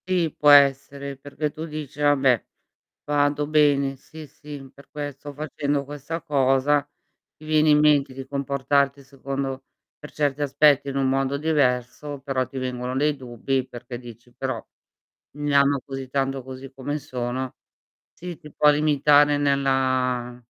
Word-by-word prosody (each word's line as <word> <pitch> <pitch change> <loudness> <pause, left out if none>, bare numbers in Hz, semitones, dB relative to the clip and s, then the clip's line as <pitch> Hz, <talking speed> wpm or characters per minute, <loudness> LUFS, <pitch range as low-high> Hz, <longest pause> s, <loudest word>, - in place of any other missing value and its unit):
Sì, 175 -4 +1
può 150 - +3
essere 140 0 +4
perché 145 +2 -4
tu 155 +2 -6
dici: 150 -2 -7
"Vabbè, 135 -5 +3 0.6
vado 145 0 +1
bene". 145 -3 +3
Sì, 155 +3 -12
sì, 145 -1 -11
per 140 - -18
questo 145 -1 -7
facendo 145 -1 -2
questa 145 +4 -6
cosa, 140 -1 +2 0.5
ti 155 - -16
viene 155 0 +3
in 150 0 +5
mente 145 -3 +3
che 135 0 -7
comportarti 140 0 0
secondo 135 0 -5 0.3
per 150 - -11
certi 145 -1 -1
aspetti 145 0 +3
in 140 - -4
un 135 -1 +1
mondo 135 +1 0
diverso, 145 -1 0
però 135 -2 -1
ti 130 +2 -7
vengono 125 0 -3
dei 150 +2 +1
dubbi 130 +1 -2
perché 120 0 -8
dici: 120 0 -13
"Però, - - -4 0.7
mi 145 0 -1
amo 140 0 +4
così 135 -1 -6
tanto 135 -1 -1
così 130 +1 -9
come 140 +3 -4
sono" 130 -2 -4 0.6
sì, 175 -2 -7
ti 150 -2 -13
può 150 +1 +4
limitare 145 0 +4
nella 130 -3 0
140 Hz, 145 wpm, -24 LUFS, 130-145 Hz, 0.7 s, in